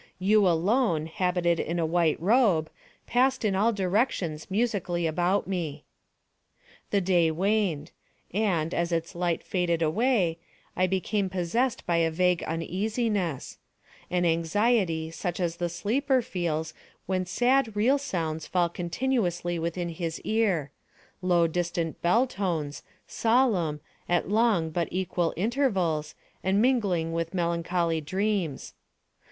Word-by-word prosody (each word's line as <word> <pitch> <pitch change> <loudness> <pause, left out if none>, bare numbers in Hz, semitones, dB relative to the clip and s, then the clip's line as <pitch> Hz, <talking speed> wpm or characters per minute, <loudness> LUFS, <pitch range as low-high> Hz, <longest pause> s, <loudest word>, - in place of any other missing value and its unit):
You 200 +2 +4
alone, 175 0 +2
habited 175 0 0
in 170 +2 -2
a 165 - +1
white 165 -1 +1
robe, 190 -5 +3 0.3
passed 255 0 +2
in 200 -2 +1
all 215 +4 +3
directions 190 - -1
musically 190 -5 0
about 175 +5 +1
me. 160 -6 -3 1.1
The 200 - +2
day 175 -3 +3
waned; 180 -3 0 0.4
and, 180 -6 0
as 170 0 -1
its 165 0 -2
light 175 -1 -1
faded 170 -3 0
away, 180 -1 +1 0.4
I 185 - +2
became 190 +2 -1
possessed 190 +8 -1
by 170 -1 +1
a 165 -1 +3
vague 180 +1 +1
uneasiness—an 180 - -3
anxiety 165 0 +1
such 175 +2 -4
as 170 -2 -1
the 175 -1 -1
sleeper 255 - 0
feels 160 -5 -2 0.3
when 185 -1 -1
sad 245 +3 +2
real 250 +7 +3
sounds 160 - -3
fall 175 -2 +1
continuously 175 -2 -1
within 170 +1 -2
his 165 -1 -4
ear—low 180 -3 -1
distant 170 -1 -2
bell 225 +9 +3
tones, 170 - -3 0.2
solemn, 220 - +1 0.3
at 175 -1 +1
long 205 -6 +2
but 170 +1 -1
equal 180 -2 -1
intervals, 190 - 0 0.3
and 190 +2 +2
mingling 200 -10 +1
with 165 +2 -3
melancholy 170 -1 0
dreams. 190 -1 -2
180 Hz, 120 wpm, -27 LUFS, 165-210 Hz, 1.1 s, You